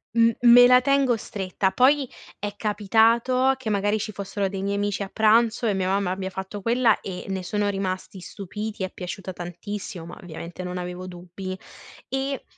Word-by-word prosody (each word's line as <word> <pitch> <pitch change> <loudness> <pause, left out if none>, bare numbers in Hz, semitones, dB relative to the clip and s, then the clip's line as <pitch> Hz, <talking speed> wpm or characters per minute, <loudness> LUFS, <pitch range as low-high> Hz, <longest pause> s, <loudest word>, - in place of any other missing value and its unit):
M 230 0 +6
me 245 0 +9
la 250 0 +7
tengo 275 -2 +3
stretta, 190 -2 -2
poi 270 +3 +4 0.3
è 205 0 -5
capitato 230 +5 +3
che 260 -4 -5
magari 205 +1 +1
ci 215 +1 -4
fossero 200 0 -3
dei 190 0 -4
miei 200 +1 -1
amici 205 0 -1
a 195 - -3
pranzo 225 +2 +3
e 210 - +2
mia 190 -1 -1
mamma 195 -1 +1
abbia 190 0 -3
fatto 190 +2 -6
quella 235 0 +3
e 185 -2 -6
ne 190 -1 -2
sono 205 +3 -1
rimasti 190 -1 -3
stupiti, 210 +3 -6
è 185 - -3
piaciuta 185 +1 -6
tantissimo, 180 +2 -6
ma 170 - -10
ovviamente 170 +1 -8
non 180 0 -4
avevo 180 +1 -5
dubbi 185 +1 -7 0.5
e 270 0 -2
200 Hz, 175 wpm, -24 LUFS, 185-230 Hz, 0.5 s, me